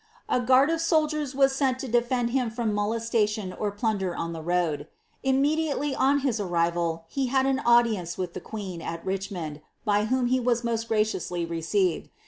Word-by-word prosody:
A - - +2
goard 260 +5 +4
of 330 0 0
soldiers 305 -4 +1
wai 275 0 +6
aeni 270 -1 +1
to 265 - -5
defend 240 0 +1
him 250 -2 +1
from 225 -1 -2
molestation 215 -2 0
or 210 +1 -2
pinnder 205 -4 -1
on 165 0 -3
the 165 - -6
road. 160 -3 0 0.4
hDn» 270 0 +3
diatelj 295 -2 0
on 280 +2 +3
his 255 -5 0
arrival, 170 -3 0
he 270 +7 -1
had 265 +1 +2
an 270 0 +1
audience 230 -9 +3
of 180 -2 -3
the - - -6
qneen, 195 -6 -6
at 165 0 -5
Richmond, 190 -6 -4 0.2
by 205 0 +2
whom 255 +2 +1
he 255 +1 +2
was 240 -1 +1
most 230 -1 -2
gracionsly 200 -6 0
received. 170 +2 0
225 Hz, 180 wpm, -26 LUFS, 180-260 Hz, 0.4 s, wai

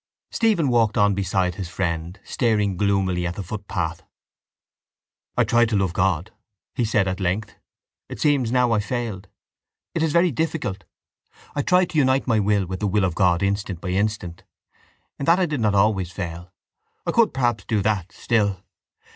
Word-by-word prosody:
Stephen 210 - +2
walked 115 -2 +2
on 100 -2 +4
beside 95 -1 0
his 90 -1 -6
friend, 85 0 -3
staring 105 -5 0
gloomily 95 -2 +1
at 90 - -4
the 100 - -5
footpath. 90 -4 -4 1.4
—I - - +5
tried 120 -1 +3
to 110 - 0
love 95 -3 +1
God, 95 +1 0 0.4
he 120 - -1
said 110 -3 +1
at 95 +1 -2
length. 100 +3 -2 0.5
It - - -7
seems 140 -6 +2
now 125 -1 +3
I 110 - +3
failed. 105 -3 -4 0.7
It 165 - -1
is 160 -1 +1
very 170 +2 +3
difficult. 115 - -3 0.7
I 145 - 0
tried 180 +3 +2
to 155 - +1
unite 130 -1 +2
my 115 -4 +2
will 100 -1 +2
with 95 +1 -5
the 105 - 0
will 100 +1 +1
of 90 - -1
God 90 -1 +2
instant 100 -2 -1
by 90 - -5
instant. 95 -3 -2 0.8
In 140 - -2
that 170 +2 +6
I 185 - +2
did 150 -5 -3
not 105 -2 +2
always 100 -3 +2
fail. 85 -1 -6 0.5
I - - 0
could 230 -1 +3
perhaps 120 -6 0
do 105 -3 0
that 100 -3 -1
still... 100 -5 0
100 Hz, 175 wpm, -23 LUFS, 95-120 Hz, 1.4 s, that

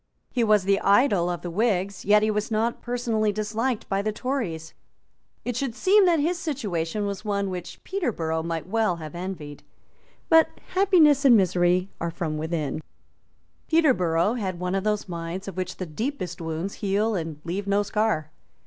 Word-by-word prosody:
He 245 - +1
was 210 -3 +4
the 195 +1 +2
idol 200 -4 +3
of 175 -1 -4
the 175 - -4
Whigs; 200 -1 0
yet 210 +1 +5
he 215 - +2
was 210 0 -2
not 225 +2 0
personally 235 -3 0
disliked 215 +3 -2
by 195 0 0
the 215 +1 -1
Tories. 205 - -3 0.7
It 245 - -2
should 250 -2 -2
seem 390 +6 +5
that 335 -3 +4
his 340 +4 0
situation 210 - -2
was 200 0 -4
one 200 -2 -1
which 180 -1 -7
Peterborough 185 - -2
might 165 -1 -3
well 215 -2 +1
have 155 -3 -8
envied. 175 -5 -6 0.7
But 325 -1 +4
happiness 345 -7 +5
and 250 -4 +7
misery 180 0 +2
are 170 - -1
from 160 -2 -3
within. 155 -2 -2 0.9
Peterborough 210 - +3
had 190 -7 -3
one 180 0 -2
of 195 -1 0
those 210 -1 -1
minds 170 +2 -5
of 195 - -6
which 185 -1 -4
the 185 - -4
deepest 180 - -4
wounds 165 +4 -3
heal 205 +3 +1
and 160 -5 -4
leave 190 +4 -4
no 200 +1 +2
scar. 205 -8 0
200 Hz, 170 wpm, -25 LUFS, 175-230 Hz, 0.9 s, and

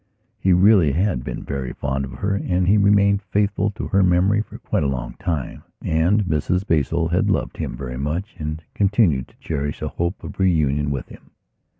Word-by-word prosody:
He 95 - +2
really 90 -5 +5
had 85 -6 0
been - - -5
very 70 -2 -4
fond 70 -1 -2
of 65 - -9
her, 100 0 -2
and 90 -2 0
he 100 - +5
remained 100 -1 +4
faithful 105 0 0
to - - -5
her 100 - +3
memory 95 +3 +3
for - - -9
quite - - -2
a 70 - +1
long 65 -3 -3
time. 85 -9 -3 0.2
And 85 +7 +2
Mrs 90 +3 0
Basil 80 0 +1
had 95 +5 +1
loved 100 - -1
him - - -4
very 65 -2 -5
much 80 +9 -3
and 75 +1 -4
continued 95 - +2
to - - -25
cherish 75 -2 -3
a - - -3
hope 85 +3 -3
of - - -9
reunion 75 -6 +2
with 70 -3 -3
him. - - -15
85 Hz, 195 wpm, -22 LUFS, 70-100 Hz, 0.2 s, really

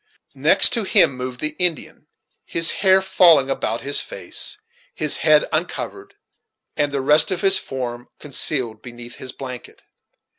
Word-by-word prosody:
Next - - +5
to 230 - -1
him 140 -8 +3
moved 125 0 -7
the 155 0 -2
Indian, 175 -4 -2 0.4
his 165 0 +1
hair 190 -1 +3
falling 170 -8 +4
about 115 -3 -3
his 140 +1 +3
face, - - -3 0.4
his - - -1
head - - +3
uncovered, 395 0 -5 0.6
and 145 -1 -1
the 140 -1 -3
rest 150 +3 +4
of 185 -3 -3
his 195 0 +4
form 120 -2 -7
concealed 130 -6 -3
beneath 120 -1 -11
his 130 - -8
blanket. 130 -2 -11
140 Hz, 145 wpm, -19 LUFS, 125-180 Hz, 0.6 s, Next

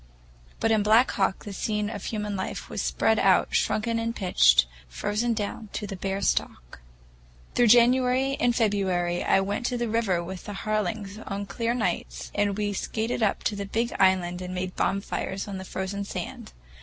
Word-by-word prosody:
But 225 - +2
in 220 -1 +4
Black 220 +5 +5
Hawk 195 -1 0
the 205 - -6
scene 210 +1 -1
of 205 -3 -6
human 210 -2 -3
life 190 - -5
was - - -2
spread 220 0 +2
out 190 -2 +4
shrunken 230 +1 +1
and 230 0 -2
pinched, 65 - +5 0.2
frozen 210 - -1
down 210 +1 -4
to 210 - -3
the 195 - -5
bare 195 +1 -3
stalk. - - -2 0.7
Through 240 - +4
January 250 +3 +4
and 240 -1 +2
February 190 -6 +1
I 195 - +3
went 205 +5 -2
to 250 - -1
the 240 0 -1
river 215 -6 0
with 185 +1 -7
the 205 - -6
Harlings 210 0 -2
on 200 0 -3
clear 230 +3 -2
nights, 185 -8 -3
and 205 -1 0
we 205 -1 -1
skated 225 +4 -2
up 210 -3 +1
to 210 - 0
the 200 -1 -4
big 230 +3 -1
island 185 -2 +3
and 180 0 -5
made 185 0 -3
bonfires 195 0 -2
on 195 -2 -5
the 190 - -7
frozen 190 +2 -4
sand. 195 - -6
205 Hz, 180 wpm, -26 LUFS, 190-225 Hz, 0.7 s, Black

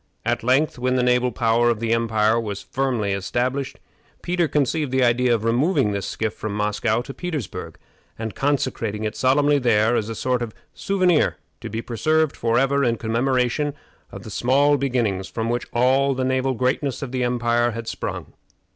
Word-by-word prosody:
At 120 0 0
length, 130 +3 +1
when 125 +1 +1
the 125 - +2
naval 125 0 +2
power 120 0 +2
of 115 -3 0
the 115 0 0
empire 110 -1 +2
was 105 -3 -5
firmly 125 -7 -1
established, 125 +7 -2 0.4
Peter 175 -1 +1
conceived 145 0 0
the 130 0 +2
idea 125 +1 +3
of 115 -2 +1
removing 130 - +2
this 100 -2 -3
skiff 110 -1 -2
from 105 -1 -5
Moscow 105 +2 0
to 135 - -8
Petersburg, 155 - -5 0.4
and 110 -1 -5
consecrating 125 -6 -1
it 110 - -3
solemnly 145 +2 +3
there 115 -2 +3
as 110 -1 -1
a 115 - -4
sort 125 +2 -1
of 115 -3 -5 0.2
souvenir 185 -5 +1 0.2
to - - -7
be 115 +2 -4
preserved 155 +6 +1
forever 135 +5 +1
in 120 -2 +2
commemoration 125 +5 0 0.4
of - - -9
the - - -9
small 140 +4 +3
beginnings 120 -9 -1
from 115 0 -3
which 120 0 -2
all 130 +3 +2
the 130 0 -1
naval 130 0 0
greatness 130 +3 -1
of 130 - -6
the 130 -1 -1
empire 120 -1 +1
had 115 0 -6
sprung. - - -5
125 Hz, 175 wpm, -22 LUFS, 115-135 Hz, 0.4 s, idea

